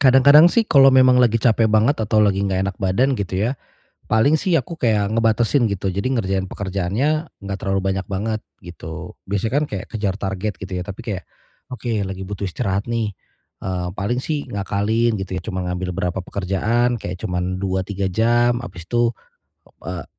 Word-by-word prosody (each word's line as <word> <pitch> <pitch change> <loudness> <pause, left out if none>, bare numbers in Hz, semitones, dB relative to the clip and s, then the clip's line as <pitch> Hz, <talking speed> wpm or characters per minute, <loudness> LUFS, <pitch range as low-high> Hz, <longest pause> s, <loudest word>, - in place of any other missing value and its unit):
Kadang-kadang 140 +5 +7
sih 230 - +3
kalau 135 -2 +7
memang 130 -1 +6
lagi 115 -2 +4
capek 115 -2 +3
banget 110 +7 +3
atau 110 0 +2
lagi 100 -2 +2
enggak 95 0 0
enak 100 - -5
badan 115 +10 +1
gitu 95 -2 -3
ya, - - 0 0.6
paling 140 +8 +3
sih 180 -3 +1
aku 165 0 -3
kayak 105 -4 +1
ngebatasin 115 +3 +2
gitu. 100 -1 -2
Jadi 100 +6 -1
ngerjain 95 -3 -1
pekerjaannya 100 +9 -1 0.3
enggak 100 0 -4
terlalu 95 -1 0
banyak 95 0 -3
banget, 110 +3 -2 0.2
gitu. 80 -2 -8 0.2
Biasanya 100 +3 -1
kan - - +1
kayak 95 -2 -5
kejar 105 -4 -1
target 95 +1 -3
gitu 95 0 -7
ya. - - -2
Tapi 100 +2 -7
kayak, 100 -6 -4 0.5
"Oke 115 -3 -2
lagi 95 0 -6
butuh 100 +1 -4
istirahat 100 +1 -2
nih." 115 -3 -1 0.5
Eee, 90 -1 -3
paling 115 +6 -1
sih 145 +1 -2
ngakalin 105 +3 0
gitu 95 -1 -5
ya - - -17
cuman 95 -4 -3
ngambil 90 +1 -3
berapa 90 +1 -1
pekerjaan 105 +6 0
kayak 90 -1 -5
cuman 90 0 -2
2, 95 0 -1
3 100 +1 -4
jam 120 +3 +2
abis 90 -8 -9
tuh, 120 0 +2 0.7
eee - - -5
105 Hz, 180 wpm, -21 LUFS, 95-120 Hz, 0.7 s, Kadang-kadang